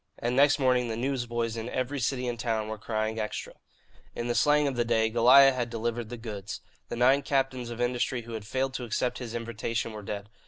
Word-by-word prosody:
And 120 +1 -1
next 145 +2 +5
morning 125 -3 +2
the 110 -1 -3
newsboys 120 -3 -2
in 115 +1 -4
every 130 +3 -2
city 125 +1 -1
and 120 -1 -3
town 110 -2 -1
were 110 0 -5
crying 110 0 -2
"Extra." 105 -1 -4 0.6
In 120 - -3
the 120 - +1
slang 150 +3 +3
of 135 - -2
the 120 - +2
day, 110 -1 +1
Goliah 130 +4 +7
had 120 -2 -2
delivered 115 0 -3
the 120 - -6
goods. 105 -4 -6 0.3
The - - -3
nine 130 +4 +4
captains 135 -3 -1
of 120 0 -7
industry 120 0 0
who 115 0 -9
had 110 -2 -6
failed 130 +3 -1
to 130 - -4
accept 120 +2 -1
his 120 -2 -6
invitation 115 0 -3
were 105 - -7
dead. 100 0 -5
120 Hz, 220 wpm, -28 LUFS, 115-130 Hz, 0.6 s, Goliah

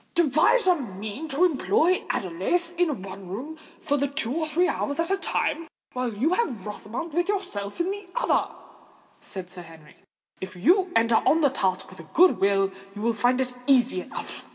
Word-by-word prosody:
"Devise 340 - +4
a 365 - +6
means 220 - -6
to 305 +7 +3
employ 320 - +2
Adelais 195 - 0
in 315 - 0
one 195 -1 -9
room 250 - -6 0.2
for 285 0 0
two 280 -3 -1
or 315 0 -1
three 345 +4 +2
hours 285 -3 -2
at 335 +3 0
a 390 - +2
time, 335 -3 -1 0.3
while 250 -1 -2
you 255 - +1
have 255 - -1
Rosamond 230 +10 -6
with 350 +3 0
you 410 -1 +2
in 360 - -4
another," - - +2 0.7
said 185 -2 -6
Sir 180 -1 -7
Henry. 160 -3 -15 0.4
"If 190 0 -7
you 360 - +3
enter 230 0 +4
on 325 - +4
the 285 -3 +4
task 190 -7 -1
with 185 - -13
a 165 - -12
good 365 +2 +6
will, 195 0 +2 0.2
you 205 - -6
will 235 0 +2
find 245 +4 +2
it 255 -1 -1
easy 250 -8 +4
enough." - - -7
260 Hz, 180 wpm, -25 LUFS, -, 0.7 s, a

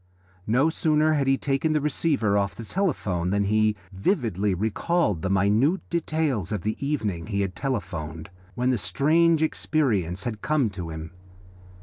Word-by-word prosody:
No 130 +9 +3
sooner 155 -1 +2
had 140 -3 +1
he 135 0 +3
taken 140 +3 0
the 155 - +2
receiver 145 -7 +1
off 100 -1 0
the 115 - -8
telephone 105 - -1
than 100 +1 +1
he 110 +1 +2 0.2
vividly 105 - 0
recalled 110 - 0
the 95 - -2
minute 105 - +2
details 155 - -1
of 105 -5 -2
the 110 +1 -1
evening 105 - -2
he 100 -2 -1
had 95 -2 -2
telephoned, 85 - -4 0.2
when 125 +1 +1
the 125 - 0
strange 155 - +3
experience 105 - 0
had 110 -4 -4
come 145 -8 +1
to 90 -4 -6
him. 80 0 -7
110 Hz, 155 wpm, -25 LUFS, 95-150 Hz, 0.2 s, No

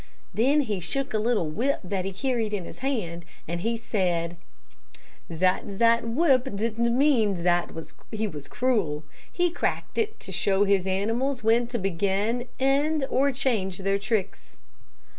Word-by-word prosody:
Then 275 +7 +3
he 215 -8 -2
shook 265 +10 -3
a 215 - +2
little 215 -6 +1
whip 245 - 0
that 185 0 -2
he 195 - -2
carried 230 0 -1
in 185 -4 -4
his - - -10
hand, 210 -11 -2 0.2
and 170 +1 -3
he 230 +3 0
said 175 -6 -1 1.0
'zat 185 +3 +1
zat 230 +2 +3
whip 260 -2 +2
didn't 230 +3 0
mean 240 -9 +3
zat 175 0 +1 0.4
he 220 0 -1
was 150 -6 -8
cruel. 195 - 0 0.3
He 350 -1 +1
cracked 350 - -2
it 440 -1 -1
to 190 - -8
show 195 +2 +2
his 195 -2 +2
animals 230 +7 0
when 230 +2 +3
to 240 0 -3
begin, 200 +5 0
end, 280 +2 +2
or 275 +2 +3
change 220 -8 0
their 195 +1 0
tricks.' 205 -1 -3
220 Hz, 155 wpm, -26 LUFS, 190-255 Hz, 1.0 s, Then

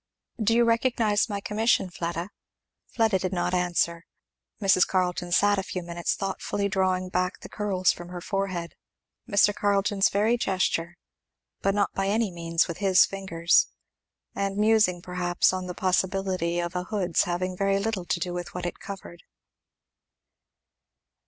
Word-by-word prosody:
"Do 225 +2 +3
you 240 - +5
recognize 230 -2 +2
my 200 -1 -2
commission, 210 -3 +1
Fleda?" 170 +2 -4 0.6
Fleda 220 -4 +1
did 185 0 -2
not 180 0 -1
answer. 175 -1 0 0.5
Mrs. 195 -3 +4
Carleton 180 -1 -1
sat 205 +2 +4
a - - 0
few 185 -1 -5
minutes 170 0 -2
thoughtfully 200 +1 -2
drawing 185 -2 0
back 180 +1 -1
the - - -10
curls 195 -3 +1
from 175 0 -9
her 180 0 -6
forehead, 185 -2 -3 0.6
Mr. 205 0 +4
Carleton's 200 -1 +2
very 215 +4 +2
gesture, 175 -4 -1 0.6
but 195 0 +1
not 200 -1 +1
by 195 0 -1
any 215 0 +1
means 170 -1 0
with 170 - -5
his 195 -2 +5
fingers; 175 -4 +2 0.7
and 195 0 -2
musing 210 -5 +3
perhaps 180 0 +1
on 185 -1 -3
the 180 - -6
possibility 185 -2 0
of 175 +1 -3
a 180 0 -2
hood's 185 -4 0
having 180 +1 -2
very 195 +1 +1
little 200 -3 -2
to 175 - -1
do 175 +1 -3
with 175 0 -6
what 180 -1 -4
it 175 - -4
covered. 195 -4 -9
185 Hz, 150 wpm, -26 LUFS, 175-200 Hz, 0.7 s, you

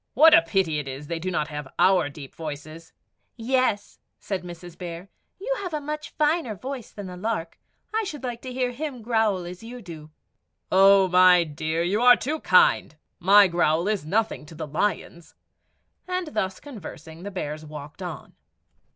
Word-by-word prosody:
"What 320 +3 +8
a - - +9
pity 165 -2 0
it 145 - -6
is 135 +2 -6
they 170 +3 -3
have 185 - -2
not 150 -4 -3
our 180 -4 +4
deep 140 -1 -11
voices." 155 +1 -8 0.4
"Yes," 250 -3 0 0.2
said 195 -2 -3
Mrs. 175 -1 -10
Bear; 175 +1 -8 0.3
"you - - -1
have 360 -5 -4
a - - -1
much 300 0 -5
finer 300 -6 +1
voice 255 +2 -6
than 205 - -9
the 180 -1 -7
lark. 180 -3 -3 0.3
I 445 +1 +1
should 300 -9 -6
like 240 -2 -4
to 255 - -7
hear 250 0 -1
him 260 -2 -6
growl 220 -5 +1
as 180 +1 -8
you 240 +2 -9
do." 165 -7 -10 0.6
"Oh, 195 0 +6
my 180 -1 +6
dear, 160 +1 -2
you 200 +6 0
are 245 0 +8
too 305 +6 -3
kind; 180 - +4 0.2
my 200 +2 +7
growl 170 0 +1
is 210 -5 0
nothing 215 +3 -1
to 160 - -12
the 155 0 -5
lion's." 170 +2 -3 0.7
And 365 -2 -2
thus 190 -8 -2
conversing, 170 - -10
the 200 - -6
bears 155 -5 -5
walked 150 +1 -10
on. 170 -6 -7
185 Hz, 175 wpm, -25 LUFS, 165-245 Hz, 0.7 s, a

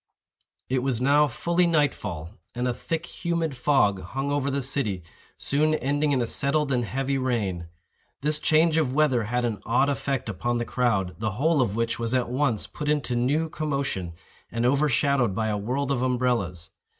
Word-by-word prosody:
It 130 0 0
was 130 -3 0
now 145 +3 +4
fully 170 +7 +1
night 150 -4 +3
fall, 85 -5 -6 0.2
and 125 +1 -1
a 125 - 0
thick 165 +6 -3
humid 170 -4 -2
fog 120 -7 +2
hung 135 +10 -3
over 140 -1 0
the 140 0 -1
city, 110 - -1 0.3
soon 155 +2 +2
ending 145 +2 0
in 130 -3 +2
a - - -1
settled 140 +4 0
and 125 -2 +1
heavy 135 +3 -1
rain. 100 -10 -1 0.5
This 150 +2 +2
change 160 +1 +3
of 135 -5 +1
weather 135 -7 +3
had 120 +2 0
an 110 -3 -3
odd 125 +5 +2
effect 135 -3 -2
upon 120 +4 -1
the 120 - -2
crowd, 110 -9 0
the 110 -2 -1
whole 145 +5 +2
of 105 -5 0
which 115 0 -1
was 115 +2 0
at 125 -2 0
once 125 -5 +1
put 150 0 -5
into 145 -4 0
new 140 +7 +1
commotion, 140 - -3 0.4
and 115 +1 -1
overshadowed 135 -4 +2
by 110 0 0
a 105 - 0
world 130 +7 -2
of 130 -3 0
umbrellas. 120 -10 -1
130 Hz, 185 wpm, -26 LUFS, 115-145 Hz, 0.5 s, now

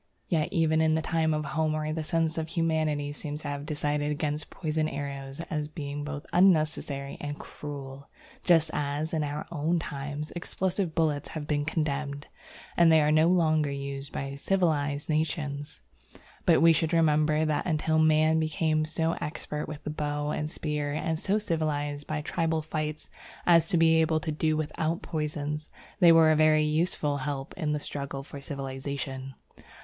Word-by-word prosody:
Yet 160 -3 +1
even 160 -1 +2
in 160 0 +3
the 160 - +1
time 160 -1 +1
of 150 -1 -1
Homer 155 +1 -1
the 160 - -2
sense 160 +1 0
of 160 - -3
humanity 155 -3 0
seems 150 0 -6
to - - -3
have 145 +1 -5
decided 150 -1 -1
against 150 0 -2
poisoned 155 -2 -1
arrows 140 0 -5
as 150 -2 -1
being 145 -1 -5
both 145 -1 -5
unnecessary 155 -6 +2
and 145 0 -4
cruel, 140 -1 -8 0.3
just 165 -3 +4
as, 145 +2 -2
in 155 -2 +1
our 145 +1 -3
own 165 +2 0
times, 145 0 -5
explosive 180 0 -2
bullets 150 -3 +1
have 155 -2 -5
been 145 -1 0
condemned, 145 -2 -2 0.5
and 170 -1 +6
are 155 -1 +5
no 155 +1 +5
longer 155 -4 +3
used 140 0 -5
by 135 0 -4
civilized 150 -3 0
nations. 150 - -2 0.7
But - - +5
we 165 0 +8
should 160 +1 0
remember 155 -1 +3
that 155 +2 0
until 160 -1 +1
man 155 0 +4
became 155 0 +1
so 160 +2 0
expert 150 0 -4
with 150 -1 -7
the 150 - -3
bow 150 -1 -2
and 150 0 -2
spear 150 -2 -2
and 160 +1 -1
so 200 +4 +1
civilized 145 -6 -2
by 155 -1 -2
tribal 160 0 -1
fights 155 -1 -4 0.3
as 165 -2 +5
to 175 - +1
be 165 0 +5
able 160 0 +2
to 155 - -2
do 155 0 +1
without 155 +2 -2
poisons, 150 -1 -3 0.3
they 175 -3 +8
were 165 -1 +7
a - - +4
very 155 0 +5
useful 150 -1 +1
help 135 0 -4
in 155 -4 -1
the 150 - -1
struggle 140 -1 -5
for 140 0 -9
civilization. 135 -1 -5
155 Hz, 165 wpm, -28 LUFS, 145-160 Hz, 0.7 s, we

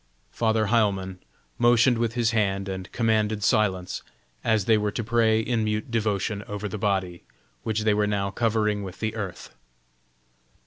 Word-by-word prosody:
Father 110 -1 +1
Heilmann 95 -5 +1 0.4
motioned 120 0 +4
with 115 -1 -1
his 115 -2 +2
hand 100 -3 0
and 95 -1 -6
commanded 110 -2 +1
silence, 100 -5 +1 0.4
as 110 -4 +2
they 110 - +5
were 105 -1 +1
to 115 - -3
pray 110 -1 +3
in 115 0 0
mute 105 +2 -2
devotion 105 -2 -1
over 105 0 -4
the 105 +1 -5
body, 95 -4 -1 0.4
which 110 -1 -1
they 110 -1 +3
were 105 0 +1
now 100 -1 -1
covering 105 -1 0
with 95 -2 -8
the 110 -1 -2
earth. 100 -5 -6
105 Hz, 155 wpm, -25 LUFS, 100-110 Hz, 0.4 s, they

